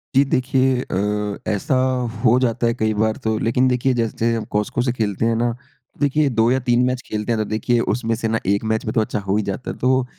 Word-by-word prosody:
जी 135 - +6
देखिए 130 0 +2
अ, 105 -1 -2
ऐसा 105 +6 0 0.5
हो 120 +1 +5
जाता 120 -2 +1
है 115 - +1
कई 110 -1 0
बार। 110 +1 0
तो 110 -1 0
लेकिन 125 +3 +2
देखिए 125 +1 +1
जैसे 115 0 0
हम 115 - -3
Cosco 105 +3 0
से 125 - +1
खेलते 110 -3 -1
हैं 115 0 +2
ना 120 0 0 0.5
देखिए 145 0 +2
2 115 -1 +2
या 130 - +2
3 120 +1 +4
मैच 125 0 -1
खेलते 105 +2 -3
हैं 115 - +1
तो 110 - 0
देखिए 115 +2 +1 0.2
उसमें 115 -2 -2
से 115 0 -2
ना 115 0 0
एक 100 +2 +1
मैच 110 - -2
में 110 - -2
तो 110 - +3
अच्छा 105 -1 -2
हो 100 0 -1
ही 105 - 0
जाता 100 +6 -4
है। - - -9
तो 130 0 +2
115 Hz, 240 wpm, -21 LUFS, 110-125 Hz, 0.5 s, जी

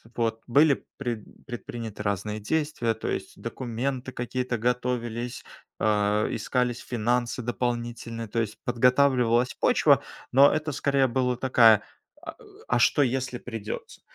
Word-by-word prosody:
Вот. 115 -1 -1
Были 140 +3 +4
пред 120 -5 -6
предприняты 115 -4 -6
разные 100 +1 -2
действия, 145 -1 -1
то 110 - -6
есть - - -4
документы 130 +2 -4
какие-то 125 0 -3
готовились, 120 0 -2 0.4
а, 105 0 +2
искались 125 -2 -1
финансы 120 +1 -1
дополнительные, 120 -1 -3
то 115 - -2
есть 110 -1 -4
подготавливалась 125 -1 +3
почва, - - +4 0.3
но 135 +3 +7
это 155 0 -1
скорее 140 -1 +2
была 125 0 0
такая, 115 -4 +5 0.4
а, - - -7
э, - - -20 0.3
а - - +2
что 145 +4 +4
если 130 -1 -1
придётся? 115 -4 -7
120 Hz, 125 wpm, -26 LUFS, 115-130 Hz, 0.4 s, но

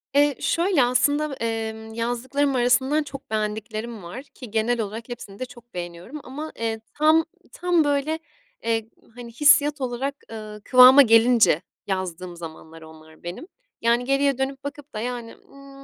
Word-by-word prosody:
Eee, 290 -1 +4
şöyle 340 -4 +2
aslında, 285 +4 +1
emm, 220 -2 -4
yazdıklarım 250 +5 -1
arasından 260 +5 +2
çok 275 -1 -10
beğendiklerim 215 0 -3
var, 180 +10 -8
ki 255 -4 -13
genel 225 +2 +1
olarak 220 +3 -6
hepsini 205 -4 -9
de 255 - -3
çok 240 -1 -17
beğeniyorum 175 - -7
ama, 300 +5 -7
eee, 225 -1 -2
tam, 315 +2 +4 0.3
tam 350 -2 +2
böyle, 290 +2 0 0.4
eee, 225 -1 -1 0.3
hani, 240 -1 -9
hissiyat 295 +2 +4
olarak, 260 +2 -2 0.2
ııı, 215 -1 -8
kıvama 255 +2 +9
gelince 230 - +5 0.3
yazdığım 185 -2 -4
zamanlar 165 -1 -10
onlar 160 0 -15
benim. 175 - -7 0.3
Yani 235 +1 +2
geriye 275 0 +2
dönüp 270 +1 -3
bakıp 290 0 -8
da 215 - -4
yani, 240 0 -5
ııı, 275 0 -16
245 Hz, 150 wpm, -24 LUFS, 220-280 Hz, 0.4 s, kıvama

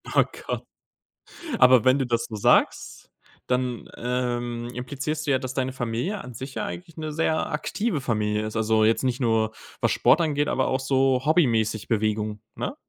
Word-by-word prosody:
Oh - - +7 0.2
Gott. - - -2 1.0
Aber 125 -2 +6
wenn 130 +2 +5
du 135 - 0
das 115 -1 0
so 110 - -8
sagst, 100 - +1 0.4
dann, 125 -1 -1
ähm, 120 -1 -2
implizierst 145 +4 -4
du - - 0
ja, 130 - +3
dass 130 0 -5
deine 130 -1 -1
Familie 125 - -3
an 125 -1 -10
sich 130 +3 -7
ja - - -1
eigentlich 170 -2 -7
'ne 155 -1 -4
sehr 160 0 0
aktive 165 +3 -1
Familie 105 -4 -1
ist. 110 - -6
Also 110 0 +3
jetzt 115 +4 +2
nicht 125 0 0
nur, 110 -2 +1 0.3
was - - +2
Sport - - +4
angeht, 145 -2 +1
aber 130 - +1
auch 130 - 0
so 130 -1 +2
hobbymäßig 115 - +2
Bewegung, 105 -1 -1 0.2
ne? - - -3
125 Hz, 175 wpm, -25 LUFS, 115-140 Hz, 1.0 s, Oh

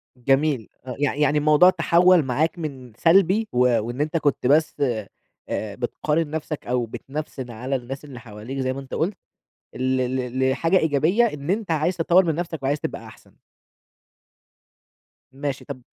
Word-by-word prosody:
جميل، 135 0 +1 0.2
آه 125 - -5
يع 145 -1 +1
يعني 150 0 +2
الموضوع 150 +4 +6
تحوّل 175 -1 +4
معاك 155 +7 0
من 130 -7 -7
سلبي 195 +5 +4
و 125 - -1 0.2
وإن 120 +6 -4
أنت 155 +2 0
كنت 145 -4 0
بس 155 +3 +3 0.7
آآ 105 -2 -3
بتقارن 150 +5 -1
نفسك 155 -1 -5
أو 125 -1 0
بتنفسن 135 0 -7
على 125 +5 -3
الناس 135 +3 -6
اللي 130 -4 -10
حواليك 115 +3 -8
زي 130 0 0
ما 135 - -6
أنت 135 - -11
قُلت، 185 +5 -1 0.6
ل - - -6
ل 130 0 0
لحاجة 165 +7 +2
إيجابية 160 - +2
إن 150 -9 -2
أنت 200 -3 -1
عايز 160 +4 0
تطوّر 175 +3 +4
من 160 -2 0
نفسك، 165 -4 -4
وعايز 145 +2 0
تبقى - - -5
أحسن. - - -17 1.9
ماشي 140 0 -4
طَب 135 -3 -7
145 Hz, 160 wpm, -23 LUFS, 130-165 Hz, 1.9 s, الموضوع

